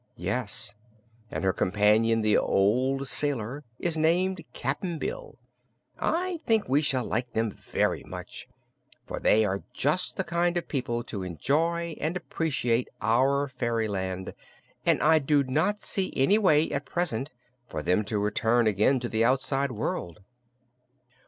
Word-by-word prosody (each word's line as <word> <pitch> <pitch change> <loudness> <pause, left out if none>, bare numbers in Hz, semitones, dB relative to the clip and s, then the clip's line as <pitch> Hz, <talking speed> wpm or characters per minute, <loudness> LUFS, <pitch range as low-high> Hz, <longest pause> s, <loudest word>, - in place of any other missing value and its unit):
"Yes; 105 +2 0 0.6
and - - -4
her 95 -1 +2
companion, 105 +4 +3
the 110 -1 +3
old 130 +7 +2
sailor, 140 -1 -1
is 170 -2 -1
named 170 +3 +1
Cap'n 155 +8 -3
Bill. - - -5 0.6
I 350 +1 -1
think 225 -3 +2
we 140 +3 +3
shall 130 -5 0
like 120 +1 -2
them 110 -1 0
very - - -1
much, - - -8 0.6
for - - -6
they 110 +1 +4
are 100 0 -1
just 150 +8 0
the 190 - +1
kind 175 0 0
of 175 - -3
people 120 -4 -2
to 100 -4 -6
enjoy 160 - -1
and 165 +4 -1
appreciate 125 -9 -1
our 135 +6 +2
fairyland 110 -7 -2 0.5
and - - +3
I 160 +1 +5
do 145 0 +2
not 155 +11 0
see 190 -2 -1
any 170 +11 +4
way, 160 -6 +3
at 145 0 -3
present, 155 -7 -1 0.4
for - - -5
them 90 +4 +2
to 105 +1 -2
return 110 +3 +2
again 110 +6 +3
to 120 - -2
the 110 -1 +1
outside 135 +2 +1
world." 105 -4 -4
130 Hz, 145 wpm, -27 LUFS, 110-160 Hz, 0.6 s, I